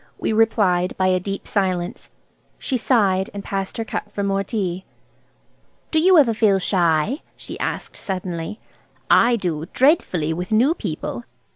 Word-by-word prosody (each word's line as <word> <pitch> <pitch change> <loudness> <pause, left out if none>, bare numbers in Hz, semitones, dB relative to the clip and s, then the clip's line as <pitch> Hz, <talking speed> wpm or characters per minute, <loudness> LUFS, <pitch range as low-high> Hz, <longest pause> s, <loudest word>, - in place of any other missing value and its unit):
We - - -1
replied 200 -5 +2
by 185 0 +2
a 185 0 +2
deep 195 +2 -5
silence. 185 -4 -2 0.5
She 265 - -3
sighed, 205 -6 +2
and 200 - -5
passed 195 -1 -4
her 225 - -2
cup - - -5
for 200 - -3
more 195 0 0
tea. 190 -3 -3 1.1
"Do 315 - +3
you 365 +2 +5
ever 260 -7 +5
feel 215 -3 +3
shy," 180 - +1 0.2
she - - -9
asked - - -4
suddenly. 185 +1 -4 0.5
"I 240 +1 +5
do, 170 -7 -3
dreadfully, 185 - +2
with 180 +4 -5
new 245 +9 +4
people." 155 - -5
195 Hz, 150 wpm, -21 LUFS, 180-225 Hz, 1.1 s, you